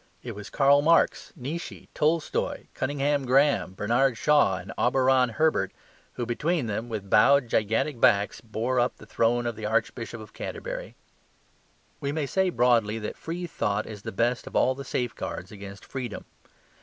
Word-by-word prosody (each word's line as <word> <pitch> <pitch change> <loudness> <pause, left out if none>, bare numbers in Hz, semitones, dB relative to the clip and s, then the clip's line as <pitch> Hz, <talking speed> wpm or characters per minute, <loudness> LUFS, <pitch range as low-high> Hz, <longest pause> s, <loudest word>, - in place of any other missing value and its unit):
It - - -5
was 105 0 -9
Karl 140 0 +4
Marx, 165 +3 +3
Nietzsche, 155 +4 -6
Tolstoy, 155 +1 0
Cunninghame 145 +1 0
Grahame, 135 -6 +2
Bernard 120 +5 +1
Shaw 145 -5 +3
and 90 +2 -8
Auberon 130 0 +3
Herbert, 155 +8 +1 0.4
who 120 - -3
between 150 +5 0
them, 110 +2 -3
with 105 -3 -5
bowed 135 +4 +5
gigantic 115 +5 0
backs, 105 -5 +3
bore 115 +3 -1
up 120 +1 0
the - - -13
throne 115 +2 +1
of 120 -1 -2
the 110 -1 -4
Archbishop 115 +1 -2
of 110 - -12
Canterbury. - - -6 1.0
We 140 -1 -2
may 150 -1 -1
say 190 +6 +1
broadly 115 -8 +2
that 105 -1 -5
free 175 +2 -5
thought 105 -10 -1
is 105 -2 -9
the - - -6
best 120 +5 0
of - - -9
all 130 - +4
the 140 +1 -8
safeguards 125 -3 -4
against 100 -1 -10
freedom. 125 -5 -6
125 Hz, 160 wpm, -26 LUFS, 110-145 Hz, 1.0 s, bowed